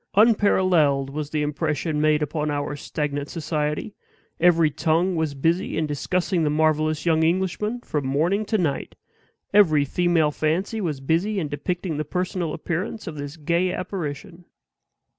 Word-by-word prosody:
Unparalleled 185 Hz, -, +3 dB
was 150 Hz, 0 st, -4 dB
the 150 Hz, -1 st, -1 dB
impression 150 Hz, +1 st, -1 dB
made 155 Hz, 0 st, +3 dB
upon 150 Hz, +1 st, -2 dB
our 145 Hz, 0 st, -2 dB
stagnant 145 Hz, -1 st, -3 dB
society; 150 Hz, +3 st, -2 dB, 0.5 s
every 165 Hz, -2 st, +4 dB
tongue 170 Hz, +5 st, +1 dB
was 160 Hz, -3 st, -1 dB
busy 165 Hz, +5 st, 0 dB
in 160 Hz, -, +1 dB
discussing 170 Hz, +4 st, -1 dB
the 150 Hz, -, +2 dB
marvelous 155 Hz, 0 st, +1 dB
young 160 Hz, -2 st, +3 dB
Englishman 190 Hz, +7 st, 0 dB
from 145 Hz, -, -3 dB
morning 170 Hz, +10 st, +1 dB
to 215 Hz, +1 st, 0 dB
night; 160 Hz, -8 st, -2 dB, 0.6 s
every 155 Hz, -8 st, +5 dB
female 170 Hz, 0 st, +2 dB
fancy 180 Hz, +9 st, -1 dB
was 150 Hz, -7 st, -2 dB
busy 170 Hz, +9 st, 0 dB
in 160 Hz, -, -2 dB
depicting 175 Hz, +2 st, -3 dB
the 155 Hz, -, -1 dB
personal 180 Hz, +1 st, -2 dB
appearance 175 Hz, +8 st, -4 dB
of 165 Hz, -5 st, -6 dB
this 145 Hz, +2 st, -6 dB
gay 170 Hz, +4 st, +1 dB
apparition. 175 Hz, -1 st, -5 dB
160 Hz, 145 wpm, -24 LUFS, 150-180 Hz, 0.6 s, every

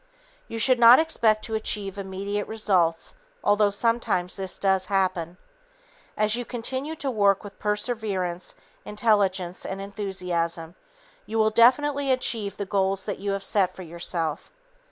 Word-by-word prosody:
You 225 Hz, -, -6 dB
should 250 Hz, +2 st, +3 dB
not 235 Hz, +1 st, +9 dB
expect 220 Hz, -9 st, +2 dB
to 225 Hz, -, -6 dB
achieve 205 Hz, -3 st, -2 dB
immediate 200 Hz, +1 st, -4 dB
results 185 Hz, -7 st, 0 dB, 0.3 s
although 205 Hz, 0 st, +3 dB
sometimes 200 Hz, -4 st, 0 dB
this 190 Hz, -2 st, -3 dB
does 190 Hz, -1 st, +1 dB
happen. 185 Hz, -3 st, -1 dB, 0.8 s
As 215 Hz, +1 st, +2 dB
you 245 Hz, -, -3 dB
continue 260 Hz, +6 st, -4 dB
to 280 Hz, -3 st, -3 dB
work 200 Hz, -3 st, +2 dB
with 205 Hz, -1 st, -11 dB
perseverance, 210 Hz, -5 st, -2 dB, 0.3 s
intelligence 200 Hz, -4 st, 0 dB
and 195 Hz, -, -5 dB
enthusiasm, 180 Hz, -5 st, -3 dB, 0.5 s
you 225 Hz, -, -3 dB
will 220 Hz, 0 st, +3 dB
definitely 275 Hz, +5 st, +3 dB
achieve 230 Hz, -5 st, -1 dB
the 200 Hz, -, -3 dB
goals 195 Hz, 0 st, 0 dB
that 205 Hz, -, -4 dB
you 200 Hz, +1 st, -3 dB
have 195 Hz, 0 st, -3 dB
set 190 Hz, -2 st, +1 dB
for 185 Hz, -, -8 dB
yourself. 170 Hz, -2 st, -3 dB
200 Hz, 140 wpm, -25 LUFS, 185-225 Hz, 0.8 s, not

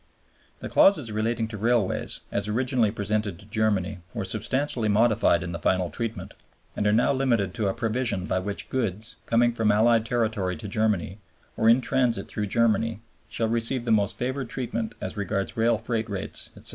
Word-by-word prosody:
(ii.) -, -, -38 dB, 0.5 s
The -, -, -5 dB
clauses 150 Hz, -, +4 dB
relating 110 Hz, +1 st, -1 dB
to 110 Hz, -2 st, -6 dB
Railways, 115 Hz, -2 st, 0 dB
as 100 Hz, +1 st, -1 dB
originally 120 Hz, +1 st, +1 dB
presented 105 Hz, -2 st, -2 dB
to 95 Hz, -, -16 dB
Germany, 105 Hz, -3 st, -1 dB, 0.2 s
were 105 Hz, -4 st, -2 dB
substantially 115 Hz, +3 st, +3 dB
modified 105 Hz, -5 st, +3 dB
in 85 Hz, -, -5 dB
the 85 Hz, -, -5 dB
final 90 Hz, +2 st, 0 dB
Treaty, 115 Hz, -1 st, -4 dB, 0.5 s
and 105 Hz, -, 0 dB
are -, -, +4 dB
now 115 Hz, +5 st, +3 dB
limited 120 Hz, -8 st, +1 dB
to 100 Hz, +3 st, -1 dB
a 95 Hz, -, 0 dB
provision 115 Hz, -4 st, -1 dB
by 95 Hz, -, 0 dB
which 100 Hz, +2 st, -5 dB
goods, 110 Hz, -4 st, -2 dB
coming 120 Hz, +1 st, +3 dB
from 115 Hz, -2 st, +2 dB
Allied 115 Hz, +2 st, +4 dB
territory 110 Hz, -6 st, -1 dB
to 90 Hz, -, -7 dB
Germany, 105 Hz, -2 st, -1 dB, 0.4 s
or 110 Hz, -, +3 dB
in 120 Hz, +3 st, +5 dB
transit 125 Hz, -1 st, 0 dB
through 105 Hz, -1 st, -3 dB
Germany, 115 Hz, 0 st, +1 dB, 0.3 s
shall 115 Hz, -, -1 dB
receive 115 Hz, +2 st, 0 dB
the 115 Hz, -, 0 dB
most 105 Hz, -2 st, +2 dB
favored 130 Hz, 0 st, -3 dB
treatment 115 Hz, -3 st, -3 dB
as -, -, -4 dB
regards 100 Hz, -1 st, -2 dB
rail 115 Hz, 0 st, +2 dB
freight 115 Hz, 0 st, -3 dB
rates, 100 Hz, -2 st, -2 dB
etc. -, -, -10 dB
110 Hz, 185 wpm, -25 LUFS, 100-115 Hz, 0.5 s, in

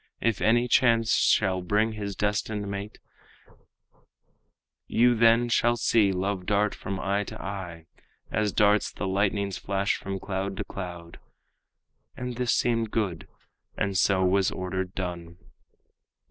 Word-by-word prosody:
If 115 Hz, -4 st, 0 dB
any 120 Hz, +2 st, +3 dB
chance 115 Hz, -2 st, +3 dB
shall 95 Hz, -3 st, +2 dB
bring 105 Hz, +5 st, +1 dB
his 100 Hz, -2 st, -5 dB
destined 105 Hz, 0 st, -1 dB
mate, 100 Hz, +1 st, -6 dB, 1.9 s
You 120 Hz, +1 st, +4 dB
then 115 Hz, +1 st, +4 dB
shall 120 Hz, 0 st, +2 dB
see 110 Hz, -3 st, +3 dB
love 95 Hz, 0 st, -2 dB
dart 105 Hz, 0 st, +2 dB
from 95 Hz, -1 st, -5 dB
eye 100 Hz, +1 st, 0 dB
to -, -, -9 dB
eye, 90 Hz, -5 st, -6 dB, 0.5 s
As 105 Hz, -1 st, 0 dB
darts 105 Hz, 0 st, +3 dB
the -, -, -5 dB
lightning's 100 Hz, 0 st, 0 dB
flash 100 Hz, +1 st, -1 dB
from 95 Hz, 0 st, -5 dB
cloud 95 Hz, 0 st, -4 dB
to -, -, -2 dB
cloud." 85 Hz, -3 st, -8 dB, 1.0 s
And 125 Hz, -1 st, -5 dB
this 125 Hz, -1 st, 0 dB
seemed 115 Hz, -2 st, +1 dB
good, 100 Hz, -7 st, -2 dB, 0.5 s
and 100 Hz, -1 st, -1 dB
so 95 Hz, +1 st, +3 dB
was 95 Hz, +1 st, +3 dB
ordered 95 Hz, 0 st, -4 dB
done. 85 Hz, -2 st, -5 dB
100 Hz, 135 wpm, -26 LUFS, 95-110 Hz, 1.9 s, You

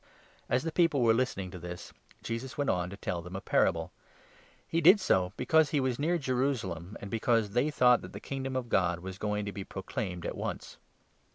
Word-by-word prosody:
" -, -, -30 dB
As 125 Hz, +2 st, +2 dB
the 165 Hz, -, -2 dB
people 155 Hz, -6 st, +3 dB
were 115 Hz, -1 st, +5 dB
listening 110 Hz, -6 st, -1 dB
to 90 Hz, -, -8 dB
this, 90 Hz, 0 st, -8 dB, 0.3 s
Jesus 115 Hz, +3 st, -4 dB
went 145 Hz, -1 st, +1 dB
n -, -, +2 dB
oVThe -, -, -1 dB
on 90 Hz, 0 st, -3 dB
to 100 Hz, -, -8 dB
tell 90 Hz, -3 st, -3 dB
them 90 Hz, +2 st, -9 dB
a -, -, -2 dB
parable. 80 Hz, -2 st, +1 dB, 0.8 s
He 165 Hz, -, 0 dB
did 185 Hz, +6 st, +8 dB
so 95 Hz, -, +2 dB
because 160 Hz, -1 st, +3 dB
he 150 Hz, -, 0 dB
Pounds. 135 Hz, -, +2 dB
was 125 Hz, -, -3 dB
near 170 Hz, +4 st, +2 dB
Jerusalem, 125 Hz, -, -2 dB
and 100 Hz, -, -8 dB
because 115 Hz, -2 st, +1 dB
they 125 Hz, +7 st, +2 dB
thought 125 Hz, -4 st, +4 dB
that -, -, -9 dB
the -, -, -7 dB
Kingdom 135 Hz, -1 st, -4 dB
of 130 Hz, -2 st, -2 dB
God 90 Hz, -5 st, +1 dB
was 95 Hz, +1 st, -7 dB
going 105 Hz, -1 st, -1 dB
to 100 Hz, -, -3 dB
be 100 Hz, -, -6 dB
proclaimed 95 Hz, -2 st, -5 dB
at -, -, -3 dB
once. -, -, -5 dB
115 Hz, 225 wpm, -30 LUFS, 95-135 Hz, 0.8 s, did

